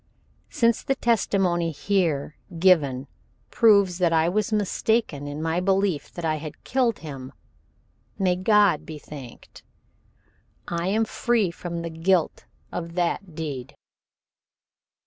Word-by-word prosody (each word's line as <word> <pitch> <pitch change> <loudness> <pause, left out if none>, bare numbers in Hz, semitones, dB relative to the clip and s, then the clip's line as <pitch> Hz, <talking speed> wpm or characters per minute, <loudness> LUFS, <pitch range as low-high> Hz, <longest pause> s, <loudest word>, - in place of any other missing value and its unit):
Since 230 -1 +2
the 270 - 0
testimony 195 -8 +1
here 160 -3 -1 0.2
given 150 -8 +3 0.5
proves 200 -6 +4
that 175 -2 +3
I 165 0 +3
was 210 +3 0
mistaken 210 -6 0
in 145 +2 -5
my 165 +2 0
belief 190 -3 0
that 175 - -5
I 155 -1 +1
had 150 0 -9
killed 245 -4 +1
him, 135 -3 -7 0.9
may 185 -2 +2
God 205 -2 +3
be 155 - -8
thanked, 140 -5 -11 1.1
I 170 +1 -2
am 220 +3 +2
free 225 -5 0
from 170 0 -6
the 165 - -5
guilt 165 +1 0 0.3
of 170 -1 -5
that 175 0 -1
deed. 145 -4 -5
175 Hz, 125 wpm, -25 LUFS, 155-200 Hz, 1.1 s, proves